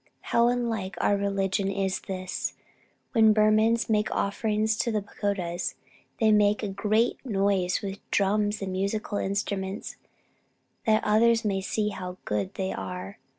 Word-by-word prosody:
How 235 Hz, 0 st, +5 dB
unlike 230 Hz, -6 st, -1 dB
our 205 Hz, -, +3 dB
religion 195 Hz, -1 st, 0 dB
is 195 Hz, -1 st, -1 dB
this! 185 Hz, -1 st, -4 dB, 0.6 s
When 220 Hz, -3 st, +5 dB
Burmans 215 Hz, +2 st, +3 dB
make 215 Hz, -1 st, +1 dB
offerings 215 Hz, +2 st, 0 dB
to 235 Hz, -, 0 dB
the 210 Hz, -2 st, -1 dB
pagodas 195 Hz, -4 st, -3 dB, 0.4 s
they 220 Hz, -2 st, +4 dB
make 210 Hz, 0 st, +3 dB
a -, -, 0 dB
great 215 Hz, +4 st, +1 dB
noise 195 Hz, -6 st, +1 dB
with 195 Hz, 0 st, -4 dB
drums 205 Hz, +1 st, +1 dB
and 190 Hz, -, -3 dB
musical 200 Hz, +2 st, -2 dB
instruments 195 Hz, 0 st, -3 dB, 0.9 s
that 215 Hz, 0 st, +4 dB
others 225 Hz, +2 st, +3 dB
may 195 Hz, -2 st, 0 dB
see 210 Hz, +2 st, -1 dB
how 185 Hz, -2 st, -6 dB
good 105 Hz, -3 st, -2 dB
they 190 Hz, 0 st, -2 dB
are. 185 Hz, +3 st, -6 dB
205 Hz, 140 wpm, -27 LUFS, 195-215 Hz, 0.9 s, How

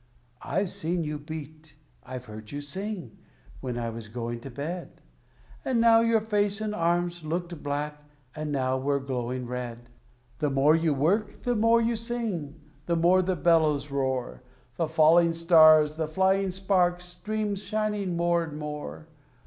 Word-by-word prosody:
I've 190 Hz, +4 st, -1 dB
seen 170 Hz, +2 st, -2 dB
you 150 Hz, -1 st, -4 dB
beat, 155 Hz, 0 st, -9 dB, 0.3 s
I've 125 Hz, -1 st, -7 dB
heard 110 Hz, -1 st, -10 dB
you 145 Hz, -, -4 dB
sing, 175 Hz, -, -6 dB, 0.4 s
when 125 Hz, -2 st, -4 dB
I 115 Hz, -1 st, -2 dB
was 115 Hz, -1 st, -8 dB
going 120 Hz, +1 st, -4 dB
to 135 Hz, -, -9 dB
bed; 155 Hz, +7 st, -6 dB, 0.6 s
And 255 Hz, -3 st, +1 dB
now 230 Hz, 0 st, +6 dB
your 230 Hz, -1 st, +3 dB
face 205 Hz, -1 st, 0 dB
and 215 Hz, -1 st, -2 dB
arms 175 Hz, -1 st, 0 dB
looked 170 Hz, +1 st, -4 dB
black, 150 Hz, +1 st, -3 dB, 0.3 s
and 155 Hz, -1 st, -4 dB
now 130 Hz, -2 st, 0 dB
were 140 Hz, +1 st, 0 dB
glowing 125 Hz, -2 st, -3 dB
red. 120 Hz, -1 st, -6 dB, 0.5 s
The 150 Hz, -2 st, +1 dB
more 135 Hz, +3 st, +4 dB
you 165 Hz, -1 st, +1 dB
work, 190 Hz, +10 st, 0 dB
the 245 Hz, -1 st, +1 dB
more 230 Hz, +2 st, +4 dB
you 230 Hz, +1 st, +1 dB
sing, 220 Hz, -, -4 dB, 0.3 s
the 170 Hz, -, +2 dB
more 175 Hz, +3 st, +4 dB
the 185 Hz, 0 st, 0 dB
bellows 155 Hz, -5 st, +2 dB
roar; 130 Hz, -3 st, -2 dB, 0.3 s
The 165 Hz, +6 st, -1 dB
falling 165 Hz, +2 st, +5 dB
stars, 155 Hz, -2 st, +6 dB
the 160 Hz, -1 st, -1 dB
flying 190 Hz, +4 st, +2 dB
sparks, 180 Hz, -2 st, +1 dB
stream 210 Hz, +3 st, -3 dB
shining 205 Hz, -2 st, -2 dB
more 170 Hz, 0 st, +2 dB
and 155 Hz, -2 st, -7 dB
more. 150 Hz, +1 st, -6 dB
160 Hz, 155 wpm, -27 LUFS, 140-190 Hz, 0.6 s, now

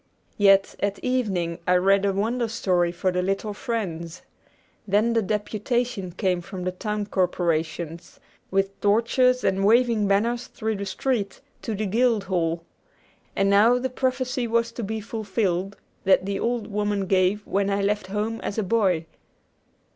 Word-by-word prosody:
Yet 195 Hz, -1 st, +5 dB
at 200 Hz, 0 st, -1 dB
evening 190 Hz, -10 st, -1 dB
I 180 Hz, -, +4 dB
read 195 Hz, +2 st, +3 dB
a 200 Hz, -, +2 dB
Wonder 230 Hz, +5 st, 0 dB
Story 180 Hz, -6 st, +1 dB
for 180 Hz, +2 st, -1 dB
the 180 Hz, 0 st, 0 dB
little 195 Hz, +3 st, -2 dB
friends. 185 Hz, -8 st, -4 dB, 0.6 s
Then 210 Hz, +4 st, +2 dB
the 230 Hz, -, +3 dB
deputation 215 Hz, 0 st, -2 dB
came 185 Hz, -2 st, 0 dB
from 185 Hz, +1 st, -7 dB
the 185 Hz, -, -1 dB
town 210 Hz, +2 st, -3 dB
corporations, 170 Hz, -3 st, -2 dB, 0.3 s
with 195 Hz, 0 st, -1 dB
torches 245 Hz, +4 st, +3 dB
and 190 Hz, 0 st, +1 dB
waving 225 Hz, 0 st, +3 dB
banners 235 Hz, +5 st, +1 dB
through 220 Hz, -4 st, -3 dB
the 200 Hz, 0 st, -4 dB
street, 205 Hz, 0 st, -2 dB, 0.2 s
to 220 Hz, -, -3 dB
the 215 Hz, +2 st, -2 dB
guild 225 Hz, +1 st, +2 dB
hall. 170 Hz, -3 st, -1 dB, 0.7 s
And 195 Hz, -, +2 dB
now 210 Hz, +5 st, +5 dB
the 255 Hz, 0 st, -2 dB
prophecy 255 Hz, -1 st, -1 dB
was 230 Hz, 0 st, +1 dB
to 230 Hz, -, -6 dB
be 220 Hz, +2 st, -3 dB
fulfilled 205 Hz, -3 st, -2 dB, 0.3 s
that 190 Hz, -1 st, +4 dB
the 195 Hz, 0 st, -2 dB
old 235 Hz, -2 st, -1 dB
woman 205 Hz, -1 st, -1 dB
gave 190 Hz, +2 st, +2 dB
when 200 Hz, 0 st, 0 dB
I 200 Hz, 0 st, 0 dB
left 205 Hz, -1 st, 0 dB
home 210 Hz, +3 st, -2 dB
as 200 Hz, -, -4 dB
a 220 Hz, -, +1 dB
boy. 185 Hz, -5 st, +1 dB
200 Hz, 155 wpm, -24 LUFS, 190-230 Hz, 0.7 s, Yet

